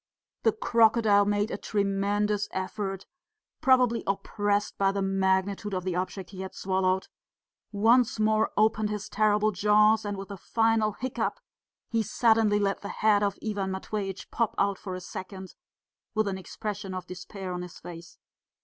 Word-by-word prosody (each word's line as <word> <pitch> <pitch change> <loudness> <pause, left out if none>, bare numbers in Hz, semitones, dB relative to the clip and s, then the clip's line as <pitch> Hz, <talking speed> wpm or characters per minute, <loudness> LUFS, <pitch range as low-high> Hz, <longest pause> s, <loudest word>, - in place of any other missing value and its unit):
The - - +4
crocodile 225 - +4
made 205 +2 0
a - - -2
tremendous 205 +1 0
effort, 195 0 -4 0.6
probably 250 -3 +4
oppressed 205 +1 -1
by 195 0 +3
the 195 0 -2
magnitude 195 +1 0
of 185 - -2
the 185 -1 -2
object 185 +1 -4
he 190 -1 -7
had 190 0 -7
swallowed, 190 0 0 0.6
once 225 +3 +3
more 215 0 +3
opened 215 0 +2
his 210 0 -4
terrible 215 0 +2
jaws, 210 +2 +4
and 205 -1 -3
with 195 +1 -7
a 200 - -6
final 225 +1 +1
hiccup 240 -2 -3 0.5
he 230 - 0
suddenly 220 -1 +3
let 200 -1 0
the 200 - -6
head 210 -1 +2
of 200 -1 0
Ivan 200 -3 -1
Matveitch 195 0 -5
pop 230 -2 0
out 200 -1 +1
for 185 -2 -5
a 185 - -6
second, 190 +1 -8 0.6
with 215 -1 +2
an 190 -1 -2
expression 195 +1 -5
of 185 - -5
despair 185 +1 -7
on 180 - -4
his 180 -1 -9
face. 170 -1 -10
205 Hz, 160 wpm, -28 LUFS, 190-215 Hz, 0.6 s, The